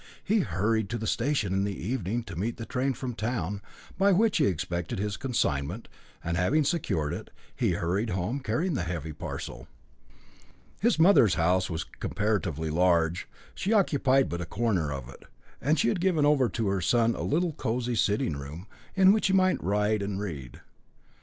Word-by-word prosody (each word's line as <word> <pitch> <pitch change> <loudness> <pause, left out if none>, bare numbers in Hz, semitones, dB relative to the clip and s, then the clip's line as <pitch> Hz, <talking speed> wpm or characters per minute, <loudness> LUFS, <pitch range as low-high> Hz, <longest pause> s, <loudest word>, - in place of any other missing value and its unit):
He 215 +2 +2
hurried 110 - 0
to 120 - -2
the 110 - -4
station 115 -4 0
in 95 0 +1
the 100 -3 -2
evening, 115 +2 -2
to 95 - -9
meet 110 +7 -2
the 115 - -6
train 130 +1 -1
from 125 +1 -4
town, 105 -4 -3 0.4
by 200 +1 +5
which 215 +3 +3
he - - +3
expected 85 -1 -2
his 100 +1 -2
consignment; 75 - -1 0.4
and 85 0 -1
having 140 - +2
secured 85 - -1
it, - - -7 0.3
he - - +1
hurried 100 +7 -1
home, 95 +8 -2
carrying 140 +9 -1
the 130 - -1
heavy 80 -3 -4
parcel. - - -7 1.1
His 230 +1 +2
mother's 160 - +6
house 90 +2 +2
was 80 -1 -2
comparatively 95 -7 -2
large; 85 0 +2 0.3
she 200 +4 -1
occupied 135 -9 +3
but 85 0 -4
a - - -3
corner 95 -7 0
of 70 -3 -5
it, 65 - -13 0.4
and 150 +6 +2
she - - +2
had 185 - -1
given 175 -6 +2
over 140 -5 +4
to 110 +2 -2
her 95 -1 0
son 115 +6 +3
a - - -5
little 170 +4 +1
cosy 125 -1 -2
sitting 105 -8 +1
room, 70 +6 -8 0.3
in 190 0 +7
which 215 - +2
he 190 - +1
might 185 -1 +3
write 105 +2 +1
and 100 -1 -3
read. 75 -11 -6
105 Hz, 180 wpm, -28 LUFS, 90-135 Hz, 1.1 s, in